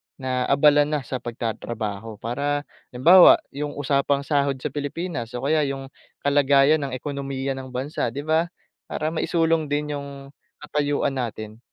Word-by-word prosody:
na 130 -2 -2
abala 145 +1 +5
na 150 -2 -2
sa 130 +1 -4
pagtatrabaho 115 -2 -5
para, 145 +5 -1 0.3
halimbawa 175 +9 +8 0.2
yung 145 +1 -5
usapang 140 0 +1
sahod 140 -1 +1
sa - - -2
Pilipinas 145 -4 -4
o 125 - -4
kaya 155 +3 +2
yung 135 0 -5 0.3
kalagayan 145 +1 +4
ng 130 - -5
ekonomiya 135 0 -4
ng 130 -1 -5
bansa, 130 +3 -3
'di 140 +5 -5
ba? 160 +2 +1 0.4
Para 155 +1 -2
maisulong 165 -1 +1
din 150 +1 -2
yung 140 -1 -10 0.3
katayuan 145 -1 0
natin. 110 -2 -5
140 Hz, 145 wpm, -23 LUFS, 130-150 Hz, 0.4 s, halimbawa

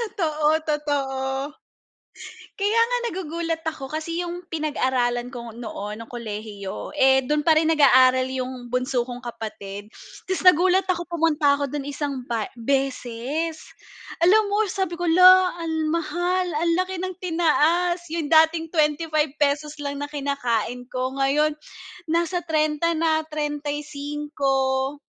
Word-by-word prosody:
Totoo, 310 -4 +1
totoo. 280 -1 -2 1.0
Kaya 415 +3 +2
nga - - +1 0.2
nagugulat 330 -2 -3
ako 275 -4 -8
kasi 315 +4 -4
'yong 350 0 -4
pinag-aralan 255 -6 -1
ko 235 -3 -8
noon 215 -2 -6
ng 230 - -11
kolehiyo, 210 -4 -6
eh 265 -1 +5
doon 295 +4 -1
pa 320 - +6
rin 315 +1 +3
nag-aaral 260 -4 +5
'yong 255 -1 -5
bunso 250 -1 0
kong 245 0 -8
kapatid. 215 -3 -7 0.3
Tas 375 +1 -2
nagulat 365 +2 +4
ako 350 -1 0
pumunta 320 -4 +2
ako 285 -1 -2
do'n 285 0 -4
isang 280 -2 -4
ba 230 -4 -2
beses. 270 +4 -2 0.6
Alam 415 +3 +5
mo 420 +1 +2
sabi 375 -2 -3
ko, 350 - -2
luh 365 +2 +7
ang 320 -2 -2
mahal 350 +2 -1
ang 335 +2 +1
laki 370 0 -4
ng 370 +1 -3
tinaas 345 0 +2
'yong 330 -1 -2
dating 320 +2 +3
₱25 300 -1 0
lang 285 -1 -4
na 290 - -4
kinakain 250 -4 -2
ko 255 +1 -3
ngayon, 280 +3 +2 0.5
nasa 340 +2 -1
30 310 0 +1
na 315 -1 +1
35. 290 -2 -2
300 Hz, 130 wpm, -23 LUFS, 265-330 Hz, 1.0 s, luh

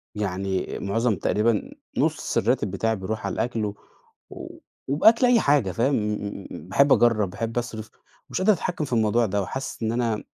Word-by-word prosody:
يعني 95 -2 -2
معظم 110 +2 0
تقريبًا 105 +2 0 0.3
نُص - - 0
الراتب 110 -3 +1
بتاعي 110 +3 0
بيروح 110 +3 -4
على - - -2
الأكْل، 115 -3 -1
و 100 - -4 1.1
وبأكل 220 - +5
أي 245 -2 +5
حاجة، 140 -10 +2
فاهم، 125 +8 +1
إمم، 105 -2 0
إمم، 100 - -7
إمم، 85 - -9
باحب 140 +7 +5
أجرب، 110 -5 +3
باحب 115 +5 -4
أصرف، 110 -2 -4 0.4
مش - - -3
قادر 210 +3 +5
أتحكم 175 -3 -3
في 130 - -6
الموضوع 115 +1 +2
ده 100 -1 -1
وحاسس 130 +3 -5
إن 110 - 0
أنا 115 -2 -1
115 Hz, 175 wpm, -24 LUFS, 105-125 Hz, 1.1 s, وبأكل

